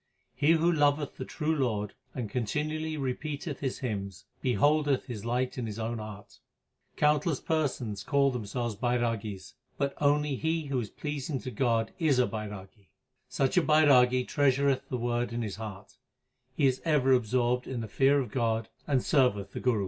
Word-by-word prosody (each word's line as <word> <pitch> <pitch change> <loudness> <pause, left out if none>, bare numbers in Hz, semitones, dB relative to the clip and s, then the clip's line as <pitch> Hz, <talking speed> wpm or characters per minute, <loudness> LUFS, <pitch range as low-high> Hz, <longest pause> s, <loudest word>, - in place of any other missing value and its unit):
He 150 +3 +3
who 165 +1 +3
loveth 145 -2 +1
the 130 - -5
true 155 +2 -1
Lord 110 -7 -1 0.2
and 125 -4 -3
continually 155 +8 -2
repeateth 140 +2 -4
His 135 -3 -2
hymns, 100 -5 -4 0.2
beholdeth 145 +3 +2
His 115 -3 -7
light 125 +2 -1
in 120 - -3
his 105 -1 -6
own 115 +1 -3
heart. 105 -2 -10 0.6
Countless 150 0 +2
persons 130 -10 -1
call 140 -1 +3
themselves 120 -1 -3
Bairagis, 110 -8 -2 0.2
but 140 0 0
only 145 -1 +2
he 160 +1 -1
who 140 -2 -1
is 110 -4 -4
pleasing 145 -1 -4
to 130 - -6
God 115 -1 +1
is 155 -6 +3
a 125 - +4
Bairagi. 105 -2 -7 0.4
Such 135 +5 0
a - - +7
Bairagi 130 -6 +5
treasureth 140 -2 +2
the 125 - -1
Word 120 -1 -1
in 115 0 -2
his 105 -3 -5
heart; 105 -3 -8 0.6
he 145 - +3
is 130 -1 +2
ever 145 -5 +3
absorbed 125 +1 +1
in 125 -3 -3
the 110 - -5
fear 135 +6 +3
of 125 -5 -3
God 115 -3 0 0.2
and 135 -3 +2
serveth 125 - +2
the - - -5
Guru. 125 -4 +1
125 Hz, 170 wpm, -29 LUFS, 115-145 Hz, 0.6 s, a